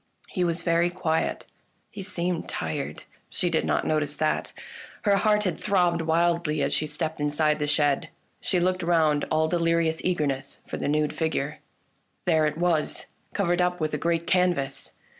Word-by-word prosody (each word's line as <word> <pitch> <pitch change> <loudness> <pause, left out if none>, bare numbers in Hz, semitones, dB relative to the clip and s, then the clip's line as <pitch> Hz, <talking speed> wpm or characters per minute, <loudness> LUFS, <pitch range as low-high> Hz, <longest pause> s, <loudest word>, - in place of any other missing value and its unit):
He 180 - -1
was 170 -1 0
very 170 0 +3
quiet, 170 -3 -1 0.5
he 205 - -7
seemed 180 -3 -3
tired. 80 -2 -4 0.3
She 175 - 0
did 160 - +1
not - - +1
notice 150 -1 0
that. 155 0 0 0.5
Her 205 -2 +4
heart 210 +1 +3
had 180 -5 -1
throbbed 180 -4 +2
wildly 165 -2 +1
as - - 0
she 155 - +1
stepped 155 +1 -3
inside 150 +1 +2
the 150 - 0
shed. 145 +1 +2 0.3
She 185 - 0
looked 185 +1 +1
round, 160 -4 +2
all 155 0 +2
delirious 165 -1 +1
eager 175 -4 +1
ness 135 -1 -3
for - - -5
the - - -2
nude 150 0 +1
figure. 150 -2 -2 0.7
There 160 -3 +3
it 150 0 -3
was, 170 -3 0 0.3
covered 175 -2 +2
up 180 0 +1
with 155 -1 -1
a 150 - -1
great 170 +1 0
canvas 175 -7 +1
165 Hz, 170 wpm, -26 LUFS, 150-175 Hz, 0.7 s, Her